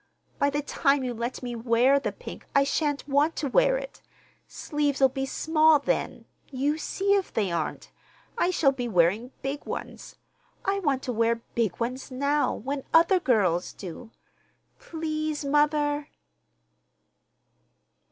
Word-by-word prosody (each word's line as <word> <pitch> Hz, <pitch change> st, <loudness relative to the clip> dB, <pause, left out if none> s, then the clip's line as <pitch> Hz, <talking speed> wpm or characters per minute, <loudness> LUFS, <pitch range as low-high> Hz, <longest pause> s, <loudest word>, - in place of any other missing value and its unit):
By 285 Hz, -, +3 dB
the 290 Hz, +1 st, -2 dB
time 280 Hz, -1 st, +1 dB
you 250 Hz, -1 st, -2 dB
let 235 Hz, +3 st, -4 dB
me 245 Hz, -1 st, -4 dB
wear 240 Hz, +4 st, +3 dB
the -, -, -3 dB
pink -, -, -10 dB
I 280 Hz, -, +6 dB
shan't 290 Hz, 0 st, -1 dB
want 290 Hz, +3 st, +2 dB
to 290 Hz, -, -2 dB
wear -, -, +3 dB
it. -, -, -8 dB, 0.5 s
Sleeves'll 285 Hz, -3 st, +1 dB
be 270 Hz, +1 st, -3 dB
small 315 Hz, +1 st, +4 dB
then—you 285 Hz, +1 st, -3 dB
see 395 Hz, +4 st, 0 dB
if 395 Hz, -2 st, 0 dB
they 200 Hz, -5 st, -1 dB
aren't—I 170 Hz, -, -4 dB
shall 315 Hz, -6 st, +3 dB
be 250 Hz, -3 st, -4 dB
wearing 200 Hz, +4 st, +2 dB
big 275 Hz, +2 st, -3 dB
ones. -, -, -7 dB, 0.5 s
I 395 Hz, 0 st, +1 dB
want 280 Hz, -7 st, 0 dB
to 250 Hz, -, -3 dB
wear 230 Hz, +1 st, +1 dB
big 225 Hz, -6 st, -1 dB
ones 250 Hz, +4 st, -3 dB
now, 280 Hz, +3 st, +1 dB
when 275 Hz, +4 st, -4 dB
other 340 Hz, +3 st, +5 dB
girls 200 Hz, -, +1 dB
do. 195 Hz, +5 st, -9 dB, 0.7 s
Please, 310 Hz, -8 st, -3 dB
mother!" 295 Hz, 0 st, +1 dB
280 Hz, 135 wpm, -26 LUFS, 245-305 Hz, 0.7 s, I